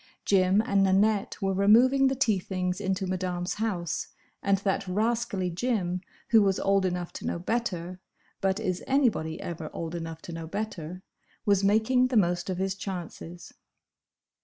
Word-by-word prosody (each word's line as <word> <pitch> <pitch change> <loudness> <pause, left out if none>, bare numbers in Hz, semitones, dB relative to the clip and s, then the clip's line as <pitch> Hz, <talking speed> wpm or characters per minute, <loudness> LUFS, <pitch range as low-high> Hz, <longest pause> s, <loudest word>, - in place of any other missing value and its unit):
Jim 195 +1 +4
and 200 -1 +2
Nanette 195 +2 +2
were 195 0 +1
removing 240 +8 +5
the 265 - +1
tea 225 -7 +2
things 180 +1 -3
into 190 -1 -1
Madame's 180 -1 -2
house, 180 -7 -2 0.3
and 200 0 +2
that 195 0 -1
rascally 205 -2 0
Jim, 180 -3 -1 0.3
who 225 -2 +6
was 195 -2 +2
old 195 -1 +2
enough 175 -1 -3
to - - -6
know - - -1
better—but 190 -1 -3
is 185 -5 -2
anybody 240 - +1
ever 160 -2 -5
old 165 0 -5
enough 165 -1 -5
to 170 - -7
know 165 -1 -6
better?—was 190 +1 -3
making 220 +5 +3
the 250 -2 +1
most 175 -2 +1
of 185 - -2
his 190 +1 0
chances. 175 -3 -7
190 Hz, 150 wpm, -28 LUFS, 180-215 Hz, 0.3 s, who